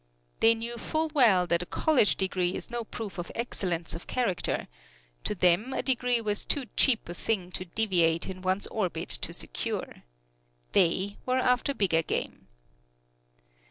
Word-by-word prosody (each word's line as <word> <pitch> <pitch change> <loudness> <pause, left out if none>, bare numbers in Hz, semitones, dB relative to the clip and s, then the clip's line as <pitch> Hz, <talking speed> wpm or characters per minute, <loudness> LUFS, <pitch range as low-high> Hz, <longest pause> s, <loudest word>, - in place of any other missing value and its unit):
They 230 0 +6
knew 235 +1 -5
full 315 +4 -1
well 220 - +5
that 170 0 +1
a - - -4
college 290 -9 +3
degree 185 -1 0
is - - -7
no 240 -1 -2
proof 215 -4 -7
of 175 - -5
excellence 180 -8 -2
of 165 - -8
character; 235 -8 -1 0.6
to 210 - 0
them 185 +8 +3
a - - -1
degree 250 -2 +2
was 210 -2 -2
too 280 -3 0
cheap 245 -5 +3
a 175 - -5
thing 185 -1 -2
to 185 - -4
deviate 170 -4 +1
in 185 -1 -6
one's 185 +2 0
orbit 180 -6 -3
to 60 - -1
secure. - - -4 0.7
They 190 +4 +2
were 255 0 +2
after 255 +2 +2
bigger 170 -7 +2
game. - - -4
205 Hz, 160 wpm, -28 LUFS, 180-240 Hz, 0.7 s, They